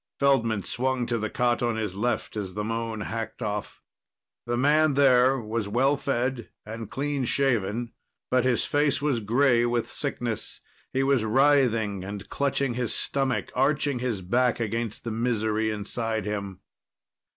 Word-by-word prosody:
Feldman 115 -7 +2
swung 130 0 -1
to 120 -1 -1
the 110 0 -2
cot 120 +1 +1
on 120 -2 +1
his 105 -4 -2
left 120 +3 -1
as 95 -3 -4
the 105 - -2
moan 115 0 -3
hacked 115 +2 -4
off. 105 -1 -4 0.6
The 120 0 0
man 150 +2 +3
there 130 -1 +5
was 110 -1 -3
well 130 +7 +2
fed 130 -3 -2 0.2
and 110 0 -7
clean 140 0 -2
shaven, 120 -3 0 0.4
but 125 -1 +3
his 130 -2 +1
face 145 -1 +1
was 140 -4 0
gray 120 +3 +3
with 120 -1 0
sickness. - - -3 0.3
He 135 +1 +1
was 135 -4 +2
writhing 115 -5 +3
and 100 +1 -7
clutching 140 -2 0
his 120 -1 -2
stomach, 135 -2 -1
arching 140 0 +1
his 120 -6 -2
back 120 +7 +1
against 115 0 -3
the 115 - -3
misery 110 -1 0
inside 110 0 -2
him. 100 -3 -4
120 Hz, 150 wpm, -26 LUFS, 110-135 Hz, 0.6 s, there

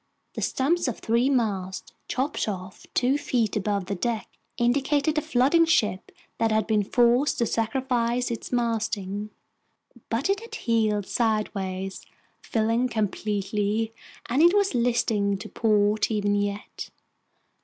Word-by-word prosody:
The - - -5
stumps 300 +5 +1
of 245 - -2
three 235 +4 +1
masts, 200 -8 -1
chopped 270 0 -1
off 185 -2 -7
two 260 +3 +2
feet 240 -7 0
above 200 -2 -1
the 200 - -3
deck, 220 +3 -2 0.3
indicated 280 +5 +1
a - - -4
flooding 280 +7 +3
ship 210 - +1 0.3
that 225 -1 +2
had 215 -1 +2
been 215 -1 +2
forced 245 +6 +3
to 235 - +2
sacrifice 240 +1 0
its 230 - -5
masting. 220 -4 -1 0.8
But 230 +4 0
it 395 +1 +1
had 460 0 -9
heeled 220 - +1
sideways, 195 -4 -2 0.4
filling 230 +2 +1
completely, 210 0 -1 0.3
and 260 +5 +2
it 345 +4 +6
was 400 -4 +2
listing 230 -4 +1
to - - -8
port 210 -1 +2
even 205 -2 +1
yet. 205 +1 -3
225 Hz, 135 wpm, -26 LUFS, 205-250 Hz, 0.8 s, it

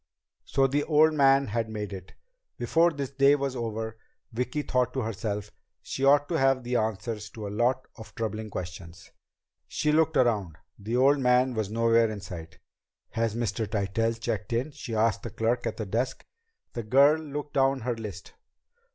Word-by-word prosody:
So 135 -1 +2
the 145 +2 +1
old 155 0 +4
man 135 -2 +4
had 115 +1 -1
made 105 -2 -5
it! 95 -1 -9 0.4
Before 165 +1 +3
this 140 -4 -5
day 140 +1 +5
was 140 -2 -2
over, 110 -1 -4 0.3
Vicki 125 +5 -2
thought 125 -2 0
to 130 - -1
herself, 105 -2 -4 0.3
she 135 - -4
ought 145 +1 +5
to 165 -2 0
have 135 -1 +3
the 125 +1 -2
answers 110 -1 -2
to 110 0 -8
a 100 - -6
lot 125 +4 +1
of 110 -2 -12
troubling 110 -1 -3
questions! 90 -2 -8 0.6
She 150 - 0
looked 160 +1 +3
around. 105 -10 +1 0.2
The 110 +4 -2
old 140 +3 +4
man 125 0 +3
was 110 -4 -2
nowhere 115 +1 +3
in 110 -1 -5
sight. 85 -5 -9 0.5
"Has 115 -1 -1
Mr. 115 -1 -2
Tytell 110 +2 0
checked 110 0 -3
in?" 125 +6 -1
she 120 -4 -6
asked 110 +1 +2
the 115 - -6
clerk 115 +3 -1
at - - -4
the 110 - -3
desk. 115 +6 -2 0.5
The 120 - -3
girl 140 +8 +5
looked 145 -1 -6
down 135 0 +2
her 120 +1 -1
list. 105 -5 -8
115 Hz, 175 wpm, -27 LUFS, 110-135 Hz, 0.6 s, day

